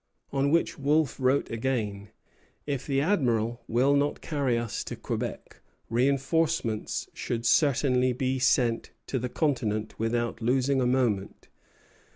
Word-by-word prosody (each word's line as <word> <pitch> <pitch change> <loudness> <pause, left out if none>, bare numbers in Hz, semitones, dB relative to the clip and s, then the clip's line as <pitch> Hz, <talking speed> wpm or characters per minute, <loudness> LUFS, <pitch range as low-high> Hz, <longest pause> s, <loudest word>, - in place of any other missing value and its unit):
On 140 0 +2
which 165 0 +1
Wolfe 145 0 +1
wrote 130 +2 +1
again: 110 -4 -2 0.6
"If 140 -3 -3
the 135 -1 +1
Admiral 120 - +1
will 125 +5 +3
not 145 +1 +1
carry 140 -6 0
us 115 -2 -3
to - - -5
Quebec, - - -5 0.3
reinforcements 135 -1 0
should 115 -1 -3
certainly 130 -2 +3
be 130 +1 -1
sent 125 -2 +1
to 130 - -2
the 125 +1 -3
continent 110 -8 -1
without 115 +1 -1
losing 130 +3 +2
a 125 - +2
moment. 120 -6 -1
130 Hz, 130 wpm, -27 LUFS, 115-140 Hz, 0.6 s, will